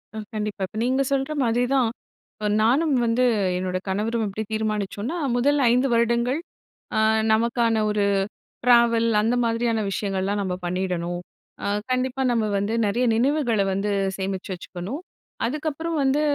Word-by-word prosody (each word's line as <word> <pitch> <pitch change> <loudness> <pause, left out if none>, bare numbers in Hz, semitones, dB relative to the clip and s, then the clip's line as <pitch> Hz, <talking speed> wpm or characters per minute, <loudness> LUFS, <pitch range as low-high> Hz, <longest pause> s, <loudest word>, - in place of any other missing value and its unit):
அ - - -5 0.2
கண்டிப்பா. 210 -1 -3
இப்ப 215 - -10
நீங்க 260 +2 +2
சொல்ற 270 +2 0
மாதிரி 240 +1 +2
தான், 250 -4 +3 0.4
இப்ப 215 - -7 0.2
நானும் 280 +7 +3
வந்து 230 +2 +2 0.3
என்னோட 185 0 -2
கணவரும் 220 +4 0
எப்படி 210 +3 -4
தீர்மானிச்சோன்னா 215 - -2 0.2
முதல் 285 +4 +2
5 250 +3 +3
வருடங்கள் 235 +4 +2 0.6
அ - - +4 0.3
நமக்கான 230 0 +2
ஒரு 210 -1 +1 0.6
ட்ராவல் 235 -1 +5
அந்த 230 +3 +1
மாதிரியான 230 -1 0
விஷயங்கள்லாம் 195 0 -1
நம்ம 185 -2 -2
பண்ணிடணும்! 175 -1 -2 0.4
அ - - -1 0.2
கண்டிப்பா 255 +1 0
நம்ம 230 -2 +1
வந்து 205 +3 -1
நெறைய 240 +5 +1
நினைவுகள 245 -4 +2
வந்து 195 +2 -1 0.3
சேமிச்சு 190 0 -4
வச்சுக்கணும்! 185 - -6 0.5
அதுக்கப்புறம் 310 +4 -3
வந்து 270 +2 +2
230 Hz, 135 wpm, -24 LUFS, 205-255 Hz, 0.6 s, ட்ராவல்